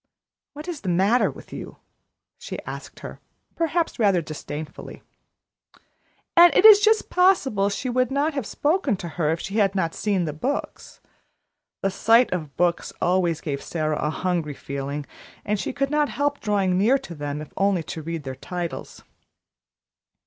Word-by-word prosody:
"What 300 Hz, +3 st, -9 dB
is 340 Hz, -4 st, -5 dB
the 190 Hz, -, -3 dB
matter 195 Hz, +8 st, +3 dB
with -, -, -12 dB
you?" -, -, -8 dB, 0.6 s
she -, -, -6 dB
asked -, -, -9 dB
her, -, -, -8 dB, 0.4 s
perhaps 330 Hz, -2 st, -1 dB
rather 200 Hz, -5 st, +4 dB
disdainfully. 155 Hz, -1 st, -8 dB, 1.3 s
And 345 Hz, 0 st, +8 dB
it -, -, +5 dB
is 425 Hz, -2 st, +11 dB
just 435 Hz, +1 st, +2 dB
possible 280 Hz, -, +3 dB
she 205 Hz, +6 st, -3 dB
would 255 Hz, 0 st, +1 dB
not 285 Hz, +4 st, 0 dB
have 275 Hz, -7 st, -3 dB
spoken 295 Hz, -, 0 dB
to 175 Hz, -, -6 dB
her, 155 Hz, -1 st, -1 dB
if 160 Hz, +1 st, 0 dB
she 195 Hz, +5 st, -4 dB
had 200 Hz, -1 st, +2 dB
not 165 Hz, -4 st, 0 dB
seen 195 Hz, -5 st, 0 dB
the 150 Hz, -, -3 dB
books. 255 Hz, -, -4 dB, 0.8 s
The 195 Hz, -, +1 dB
sight 230 Hz, +4 st, +4 dB
of 155 Hz, -6 st, -5 dB
books 175 Hz, -1 st, +1 dB
always 175 Hz, -3 st, +1 dB
gave 140 Hz, -3 st, -3 dB
Sara 155 Hz, -2 st, -2 dB
a 150 Hz, -, 0 dB
hungry 165 Hz, -3 st, -2 dB
feeling, 140 Hz, +2 st, -5 dB, 0.4 s
and 210 Hz, 0 st, 0 dB
she -, -, -2 dB
could 275 Hz, +2 st, -2 dB
not 300 Hz, -1 st, +2 dB
help 285 Hz, 0 st, -1 dB
drawing 195 Hz, -4 st, +1 dB
near 235 Hz, +7 st, +4 dB
to 175 Hz, -, -9 dB
them 145 Hz, -1 st, -4 dB
if 150 Hz, -, -9 dB
only 195 Hz, -3 st, +1 dB
to 160 Hz, -, -6 dB
read 165 Hz, 0 st, -5 dB
their 135 Hz, -1 st, -5 dB
titles. 175 Hz, +5 st, -6 dB
195 Hz, 165 wpm, -24 LUFS, 160-275 Hz, 1.3 s, is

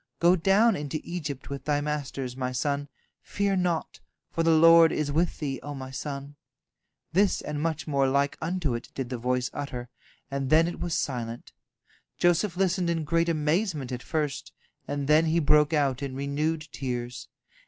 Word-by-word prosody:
Go 175 Hz, +2 st, +5 dB
down 195 Hz, +5 st, +4 dB
into 150 Hz, 0 st, -3 dB
Egypt 150 Hz, -6 st, -5 dB
with 140 Hz, -, -6 dB
thy 145 Hz, -1 st, +1 dB
masters, 140 Hz, -4 st, -3 dB
my 130 Hz, -1 st, -2 dB
son; 140 Hz, +3 st, -1 dB, 0.3 s
fear 200 Hz, -1 st, -1 dB
naught, 175 Hz, -3 st, -1 dB, 0.3 s
for 165 Hz, -, -1 dB
the 165 Hz, -, +3 dB
Lord 165 Hz, 0 st, +7 dB
is 150 Hz, -1 st, -1 dB
with 165 Hz, +4 st, +1 dB
thee, 135 Hz, -4 st, -3 dB
O 145 Hz, 0 st, -6 dB
my 130 Hz, -1 st, -7 dB
son." 140 Hz, +1 st, -6 dB, 0.8 s
This 195 Hz, +2 st, +3 dB
and 150 Hz, 0 st, -4 dB
much 160 Hz, -1 st, -1 dB
more 140 Hz, -3 st, +2 dB
like 140 Hz, +1 st, +1 dB
unto 165 Hz, -5 st, -1 dB
it 120 Hz, -, -5 dB
did 130 Hz, -2 st, -4 dB
the 125 Hz, -, -3 dB
voice 125 Hz, +1 st, 0 dB
utter, 125 Hz, -3 st, -5 dB, 0.4 s
and 135 Hz, -1 st, -2 dB
then 160 Hz, +3 st, +5 dB
it 175 Hz, -, -5 dB
was 175 Hz, -2 st, -2 dB
silent. 120 Hz, -3 st, -3 dB, 0.7 s
Joseph 175 Hz, +1 st, +2 dB
listened 185 Hz, -2 st, +1 dB
in 165 Hz, -2 st, 0 dB
great 165 Hz, +2 st, +1 dB
amazement 155 Hz, -, 0 dB
at 125 Hz, 0 st, -4 dB
first, 150 Hz, -3 st, -3 dB, 0.4 s
and 145 Hz, -1 st, -3 dB
then 155 Hz, +2 st, +5 dB
he 160 Hz, +1 st, +1 dB
broke 150 Hz, -1 st, +4 dB
out 140 Hz, -4 st, +1 dB
in 135 Hz, -2 st, -4 dB
renewed 150 Hz, +3 st, -1 dB
tears. 125 Hz, -2 st, -4 dB
150 Hz, 175 wpm, -27 LUFS, 135-165 Hz, 0.8 s, Lord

